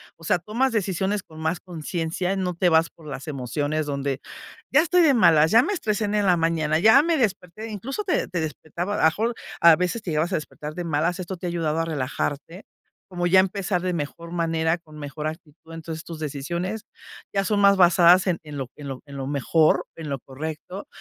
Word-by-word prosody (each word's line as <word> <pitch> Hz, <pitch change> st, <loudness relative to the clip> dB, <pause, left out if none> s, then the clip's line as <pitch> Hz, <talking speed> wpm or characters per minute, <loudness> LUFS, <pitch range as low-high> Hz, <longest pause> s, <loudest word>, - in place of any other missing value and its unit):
O 165 Hz, -, -18 dB
sea, 165 Hz, -, +2 dB
tomas 230 Hz, +9 st, -1 dB
decisiones 195 Hz, -1 st, -1 dB
con 155 Hz, 0 st, -14 dB
más 160 Hz, +2 st, -1 dB
conciencia, 175 Hz, +1 st, -3 dB
no 185 Hz, -2 st, -1 dB
te 175 Hz, +1 st, +2 dB
vas 160 Hz, 0 st, +3 dB
por 160 Hz, -2 st, -16 dB
las 135 Hz, 0 st, -7 dB
emociones 145 Hz, +2 st, -2 dB
donde, 140 Hz, -1 st, -2 dB, 0.5 s
ya 275 Hz, -, +6 dB
estoy 350 Hz, +2 st, +3 dB
de 310 Hz, -4 st, +5 dB
malas, 160 Hz, -8 st, +5 dB
ya 230 Hz, +2 st, +6 dB
me 410 Hz, -, -1 dB
estresen 215 Hz, -, -1 dB
en 205 Hz, -1 st, +2 dB
la 180 Hz, -1 st, +4 dB
mañana, 160 Hz, -2 st, +1 dB
ya 220 Hz, +9 st, +7 dB
me 335 Hz, 0 st, +1 dB
desperté, 215 Hz, -, -2 dB
incluso, 255 Hz, -, -4 dB
te 380 Hz, -, 0 dB
te 180 Hz, -, -3 dB
despertaba 160 Hz, +4 st, -4 dB
a -, -, -2 dB
lo -, -, 0 dB
mejor 220 Hz, +9 st, +2 dB, 0.3 s
a 170 Hz, -1 st, +8 dB
veces 180 Hz, +7 st, -1 dB
te 175 Hz, -, -4 dB
llegabas 160 Hz, +4 st, 0 dB
a -, -, +3 dB
despertar 150 Hz, -1 st, -6 dB
de 175 Hz, -, -4 dB
malas. 165 Hz, +3 st, 0 dB
Esto 185 Hz, +1 st, -5 dB
te 180 Hz, -, -5 dB
ha -, -, -1 dB
ayudado 165 Hz, -2 st, -1 dB
a 165 Hz, -, 0 dB
relajarte, 145 Hz, +3 st, -4 dB, 0.4 s
como 175 Hz, -1 st, -1 dB
ya 190 Hz, +2 st, +6 dB
empezar 190 Hz, -1 st, -1 dB
de 185 Hz, -1 st, -1 dB
mejor 165 Hz, +1 st, -5 dB
manera, 165 Hz, -1 st, 0 dB
con 155 Hz, -2 st, -15 dB
mejor 150 Hz, +1 st, -5 dB
actitud. 160 Hz, +1 st, -10 dB
Entonces, 165 Hz, 0 st, -7 dB
tus 165 Hz, -, -7 dB
decisiones 170 Hz, +8 st, -4 dB, 0.5 s
ya 195 Hz, -1 st, +1 dB
son 210 Hz, +1 st, +1 dB
más 200 Hz, 0 st, +6 dB
basadas 180 Hz, 0 st, +6 dB
en 175 Hz, -3 st, +1 dB
en 150 Hz, -2 st, -8 dB
lo 135 Hz, -2 st, -4 dB
en 145 Hz, -, -8 dB
lo 130 Hz, -1 st, -6 dB
en 140 Hz, -1 st, -10 dB
lo 135 Hz, -1 st, -4 dB
mejor, 150 Hz, +3 st, +2 dB
en 160 Hz, -2 st, -7 dB
lo 140 Hz, -1 st, -3 dB
correcto, 155 Hz, +8 st, -7 dB
170 Hz, 215 wpm, -24 LUFS, 155-190 Hz, 0.5 s, a